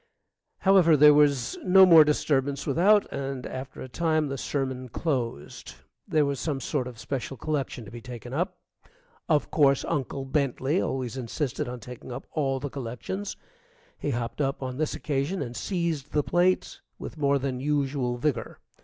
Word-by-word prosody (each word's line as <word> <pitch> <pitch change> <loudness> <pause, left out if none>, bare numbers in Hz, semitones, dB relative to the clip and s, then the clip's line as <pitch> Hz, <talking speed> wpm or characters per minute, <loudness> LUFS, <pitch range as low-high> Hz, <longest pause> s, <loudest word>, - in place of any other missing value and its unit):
However, 185 -5 +5
there 150 +1 +8
was 140 -5 +2
no 190 +1 +7
more 165 -4 +9
disturbance 140 -2 0
without, 195 +9 +4
and 135 -2 -4
after 130 +1 -7
a - - -7
time 155 +1 0
the 135 - -3
sermon 130 -2 -3
closed. 120 - -3 0.3
There 155 -2 +3
was 140 -2 -2
some 145 -4 -2
sort 135 -1 -2
of 125 - -8
a - - -20
special 135 +2 -4
collection 140 -4 -3
to 100 - -11
be 120 0 -9
taken 120 0 -8
up. 170 +6 -1 0.7
Of 150 -3 +2
course, 140 -3 +3
Uncle 135 -3 -2
Bentley 140 +4 0
always 130 -1 -3
insisted 130 +2 -3
on 125 -1 -7
taking 125 +3 -10
up 125 +2 -6
all 135 -4 0
the 140 0 -5
collections. 140 - -5 0.6
He - - -4
hopped 120 +2 -3
up 135 -1 -1
on 130 -1 -4
this 155 - -1
occasion 150 +6 -2
and 120 0 -7
seized 170 -6 -2
the 150 - +2
plate 180 +3 +1 0.2
with 155 - -8
more 140 -1 +3
than 135 -2 -3
usual 135 -3 0
vigor. 145 +3 -2
140 Hz, 170 wpm, -27 LUFS, 130-155 Hz, 0.7 s, more